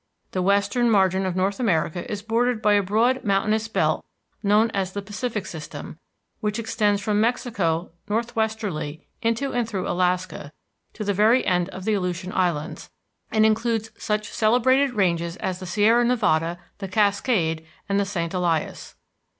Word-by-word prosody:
The 185 - -1
western 200 +5 +2
margin 190 -2 +3
of 180 - -2
North 195 +3 0
America 175 -6 0
is 205 -1 -4
bordered 235 +1 +1
by 210 -1 +3
a 205 - +4
broad 230 +7 +1
mountainous 215 +2 +1
belt 220 - 0 0.4
known 215 +2 +3
as 190 -2 -2
the 200 - -3
Pacific 210 +1 -4
System, 155 -2 -8 0.4
which 210 0 -2
extends 215 -3 +1
from 210 +1 +1
Mexico 205 -9 0 0.2
northwesterly 220 -9 -2 0.2
into 230 +4 0
and 240 -2 0
through 190 -4 -3
Alaska, 180 -4 -1 0.4
to 215 - -5
the 205 0 0
very 220 +6 +4
end 180 -1 +1
of 190 0 -8
the 220 - +2
Aleutian 180 -1 -2
Islands, 170 -5 -1 0.4
and 220 0 +3
includes 225 0 +1
such 210 -1 -2
celebrated 255 +4 +3
ranges 170 -4 +1
as 185 -1 -3
the 185 - -7
Sierra 215 +6 +4
Nevada, 175 -9 +1 0.2
the 195 - -4
Cascade, 200 -4 +1 0.2
and 200 0 +1
the 200 - +1
St. 175 -4 -3
Elias. 175 -4 -1
205 Hz, 155 wpm, -24 LUFS, 185-225 Hz, 0.4 s, a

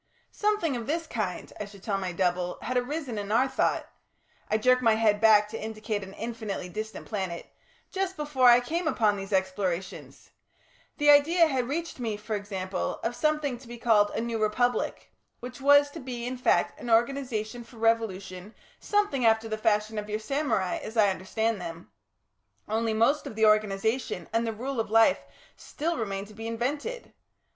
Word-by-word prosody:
"Something 420 -9 0
of 235 -2 -5
this 330 +2 -1
kind," 210 - -4
I 210 - -3
should 200 -1 -14
tell 200 -3 -1
my 185 -2 -3
double, 180 0 -1
"had 255 - -3
arisen 250 -2 -2
in 205 0 -5
our 250 +4 +4
thought" 265 - 0 0.6
I 215 - +2
jerk 255 +3 +3
my 225 -3 +4
head 215 -1 +2
back 210 -2 +6
to 225 - -6
indicate 215 -1 -3
an 190 0 -10
infinitely 220 -5 -5
distant 215 +4 -6
planet 190 -5 -4 0.5
"just 380 -1 -2
before 290 -4 +3
I 240 +1 +7
came 330 +7 -2
upon 215 -9 +2
these 195 0 -7
explorations. 190 -1 -3 0.7
The 295 -1 +6
idea 325 +4 +6
had 260 -6 -1
reached 330 +2 -4
me, 225 -4 -2
for 215 +1 -4
example, 190 -2 -3
of 235 +1 -1
something 300 -4 0
to 255 - -15
be 240 0 -8
called 215 -3 +3
a - - -1
New 230 -1 -3
Republic, 245 +4 0 0.3
which 250 +2 -9
was 285 +1 +6
to 325 - -8
be 250 -3 -5
in 250 +1 -3
fact 250 -2 +1
an 240 - -6
organisation 240 -1 0
for 235 0 -17
revolution 210 -4 -1 0.2
something 410 - 0
after 225 0 +3
the 215 - -2
fashion 215 0 0
of 210 0 -7
your 210 - -1
samurai, 220 -5 -1
as 220 +2 -7
I 205 -3 +5
understand 215 +3 -2
them 165 0 -8 0.8
only 220 +1 0
most 255 +7 +2
of - - -8
the 220 0 +3
organisation 215 +3 +1
and 230 +1 +1
the - - 0
rule 250 +4 -4
of 225 - -1
life 225 +5 +5 0.4
still 335 +3 -3
remained 200 -6 -3
to - - -13
be 225 +2 -7
invented. 285 - -3
225 Hz, 180 wpm, -27 LUFS, 210-255 Hz, 0.8 s, I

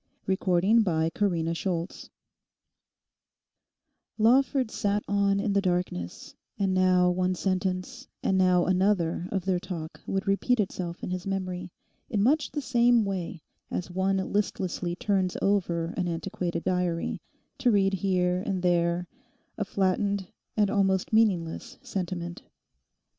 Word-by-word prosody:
CHAPTER 185 -2 +2
TWENTY 165 -8 +3
THREE 170 -1 -1 2.1
Lawford 255 +2 +3
sat 205 -2 0
on 200 0 +2
in 205 -1 0
the 200 - +3
darkness, 175 - -2 0.2
and 195 -1 +1
now 185 -1 +4
one 185 +1 0
sentence 190 +7 -2 0.2
and 190 - +2
now 185 -2 +4
another 185 -2 +1
of 190 -3 -2
their 185 -2 +1
talk 165 -3 -7
would 195 0 -1
repeat 220 +5 +2
itself 180 -3 -3
in - - -3
his 185 +1 -4
memory, 185 -2 -3 0.4
in 205 -3 +1
much 295 +6 +3
the 295 - -4
same 240 -3 +4
way 185 -4 -4 0.3
as 180 0 -4
one 190 +1 +1
listlessly 190 -3 -1
turns 190 -1 0
over 175 -4 0
an 180 - -1
antiquated 175 0 -3
diary, 180 -2 -1 0.4
to 260 -2 +3
read 195 -3 +3
here 180 -1 +1
and 190 -3 -2
there 175 0 +2 0.5
a 210 - -1
flattened 195 0 0 0.3
and 205 -2 +3
almost 195 -1 +1
meaningless 190 -7 +1
sentiment. 175 -2 -4
185 Hz, 125 wpm, -27 LUFS, 180-200 Hz, 2.1 s, now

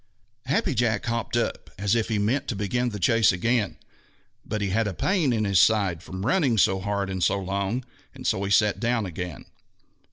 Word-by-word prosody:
Happy 140 +1 +1
Jack 115 -2 0
hopped 115 0 -2
up 120 - -2
as 100 +1 0
if 115 -2 +1
he 110 - -1
meant 115 +7 0
to 115 - -2
begin 120 +5 -1
the 105 - -6
chase 110 +4 +4
again, 105 +1 0 0.7
but 110 - -3
he 100 -1 -1
had 110 +3 +1
a 95 - -4
pain 175 - +1
in 110 -2 0
his 100 -3 +3
side 100 -7 +3
from 95 +2 -6
running 135 -4 +2
so 95 0 +3
hard 100 0 -2
and 95 -2 -3
so - - +2
long, 100 +6 -2 0.3
and - - -10
so 95 - +1
he 100 - -2
sat 105 +1 +3
down 120 -2 0
again. 90 -3 -6
105 Hz, 200 wpm, -25 LUFS, 95-120 Hz, 0.7 s, chase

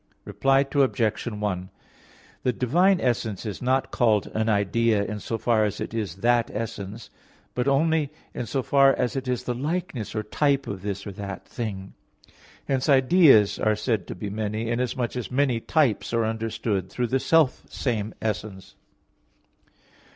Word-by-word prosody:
Reply 135 0 +2
Obj. 130 -6 +1
1: 105 -4 -3 0.7
The 125 - +1
divine 175 +11 +3
essence 115 - -1
is 105 -4 -5
not 130 +1 +1
called 110 -5 +2
an 110 +1 0
idea 105 +1 +2
in 105 0 -4
so 115 - -3
far 115 -2 +2
as 105 -1 -2
it - - -5
is 105 -7 -3
that 120 -1 +3
essence, 105 -1 -6 0.4
but 125 +1 -1
only 150 +1 +2 0.2
in 120 - -4
so 135 +2 -1
far 135 0 +5
as 125 +1 -1
it 135 -1 -3
is 125 -2 -1
the 125 - -2
likeness 145 - -3
or 110 - -1
type 140 +5 +1
of 100 -2 -5
this 100 -1 -4
or 100 - -5
that 100 0 -7
thing. 100 -5 -5 0.7
Hence 135 +2 0
ideas 135 - +5
are 110 0 +2
said 110 -1 -1
to - - -6
be 100 +2 -5
many, 110 +2 -2
inasmuch 125 0 -1
as 125 -3 -4
many 130 -2 +1
types 125 - +1
are 115 -1 +2
understood 110 -3 -2
through 125 +5 -2
the 130 +3 0
self 160 -2 +3
same 110 -4 -2
essence. 105 -3 -4
115 Hz, 160 wpm, -25 LUFS, 105-130 Hz, 0.7 s, far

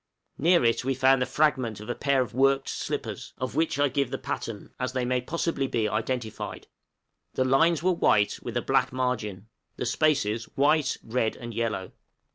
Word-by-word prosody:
Near 170 -3 +4
it 115 +2 +2
we 135 +1 0
found 130 0 +4
the 130 - +1
fragment 130 -6 +1
of 105 - -9
a 120 - -1
pair 140 -1 +2
of 115 - -10
worked 135 +2 +2
slippers, - - -4
of 130 0 -3
which 160 -3 0
I 145 0 +3
give 140 -1 0
the 135 - -3
pattern, 110 -5 -5
as 125 -1 -2
they 130 -1 -1
may 125 0 +1
possibly 155 0 -1
be 115 -4 0
identified. 110 +1 -3 0.7
The 130 - +2
lines 160 +5 +3
were 185 - +4
white, 105 - +2
with - - -4
a - - -1
black - - +2
margin; 110 -6 -2 0.3
the - - -3
spaces 115 -5 +1
white, 145 0 +3
red, 115 -1 -1
and 120 -1 -8
yellow. 110 -4 -2
130 Hz, 185 wpm, -27 LUFS, 115-140 Hz, 0.7 s, Near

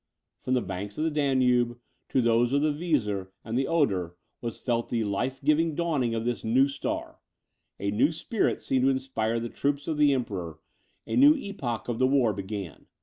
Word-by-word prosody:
From 130 - 0
the 125 - +1
banks 95 +2 -6
of 155 - 0
the 160 - +1
Danube, 125 -5 +2 0.3
to 130 - +2
those 120 +2 +3
of 140 +1 +3
the 155 -1 +2
Weser 125 - -1 0.2
and 115 +1 -4
the 135 +2 +1
Oder, 95 - +1 0.3
was 115 -2 -4
felt 120 -2 -1
the 115 -2 0
life 120 +6 -2
giving 155 +1 +2
dawning 145 -9 0
of 115 0 -2
this 120 -1 -2
new 130 +5 +4
star; 140 0 -4 0.6
a 100 0 -1
new 130 +10 +3
spirit 205 +7 -1
seemed 130 -1 +1
to - - +5
inspire 130 -4 -1
the 115 - -3
troops 140 +3 -2
of 155 - -1
the 150 -1 +5
emperor, 95 - -3 0.5
a - - -3
new 290 +4 +7
epoch 170 - -4
of 120 -2 -2
the 130 - +4
war 130 -5 +3
began. 100 -3 -6
125 Hz, 195 wpm, -27 LUFS, 110-145 Hz, 0.6 s, new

